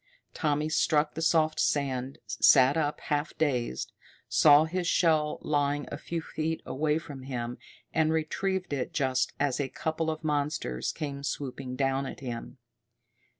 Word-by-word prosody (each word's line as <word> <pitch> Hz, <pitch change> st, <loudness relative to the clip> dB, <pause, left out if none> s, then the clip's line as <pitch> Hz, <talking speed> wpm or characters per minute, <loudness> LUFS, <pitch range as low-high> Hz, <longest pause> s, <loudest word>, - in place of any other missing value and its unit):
Tommy 150 Hz, -1 st, 0 dB
struck 155 Hz, -1 st, +2 dB
the 160 Hz, -, -5 dB
soft 160 Hz, -1 st, +2 dB
sand, 135 Hz, -2 st, 0 dB
sat 135 Hz, 0 st, +5 dB
up, 150 Hz, -2 st, 0 dB
half 145 Hz, +1 st, -2 dB
dazed, 125 Hz, -, -1 dB, 0.4 s
saw 150 Hz, 0 st, +6 dB
his 175 Hz, +2 st, -2 dB
shell 155 Hz, -4 st, +2 dB
lying 145 Hz, -1 st, 0 dB
a -, -, -4 dB
few 170 Hz, -1 st, -4 dB
feet 160 Hz, 0 st, -2 dB
away 150 Hz, +3 st, 0 dB
from 145 Hz, -4 st, -8 dB
him, 125 Hz, -2 st, -4 dB, 0.3 s
and 160 Hz, -1 st, +2 dB
retrieved 180 Hz, +3 st, -1 dB
it 140 Hz, +5 st, -3 dB
just 130 Hz, -3 st, +1 dB
as 140 Hz, -2 st, +1 dB
a 140 Hz, -2 st, -1 dB
couple 160 Hz, +3 st, -2 dB
of 155 Hz, 0 st, -3 dB
the -, -, -10 dB
monsters 145 Hz, -, -1 dB
came 140 Hz, -2 st, -5 dB
swooping 135 Hz, -2 st, -4 dB
down 135 Hz, 0 st, 0 dB
at -, -, -8 dB
him. 120 Hz, -1 st, -6 dB
145 Hz, 150 wpm, -29 LUFS, 135-160 Hz, 0.4 s, saw